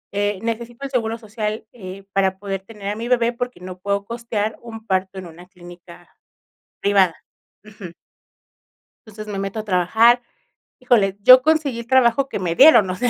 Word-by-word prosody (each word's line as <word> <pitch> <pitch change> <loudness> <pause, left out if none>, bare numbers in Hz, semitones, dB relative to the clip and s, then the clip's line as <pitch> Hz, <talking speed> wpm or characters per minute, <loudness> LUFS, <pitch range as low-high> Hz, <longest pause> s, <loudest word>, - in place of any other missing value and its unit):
Eh, 205 -1 0
necesito 235 +3 -5
el 275 - -7
seguro 225 -3 -1
social, 215 -1 -5
eh, 195 -4 -10
para 190 -1 +1
poder 195 -1 -5
tener 200 0 -11
a 205 - -3
mi 230 +2 -5
bebé 240 -1 +1
porque 245 -5 -5
no 185 0 -9
puedo 200 +1 -2
costear 225 -2 -4
un 225 -2 -10
parto 190 -1 -2
en 190 - -7
una 175 +1 -13
clínica 175 -1 -15 0.7
privada, 195 -4 +3 0.5
ujú 205 -5 -11 1.1
entonces 215 0 -10
me 200 -2 -5
meto 195 +2 -4
a 215 - -6
trabajar. 220 +6 +3 0.6
Híjole, 210 -6 +2
yo 255 +3 +8
conseguí 300 -4 0
el 235 - -9
trabajo 260 +1 +3
que - - -4
me 175 -3 -2
dieron, 265 - +7
o 185 - -2
sea, 245 +6 0
210 Hz, 175 wpm, -20 LUFS, 190-235 Hz, 1.1 s, yo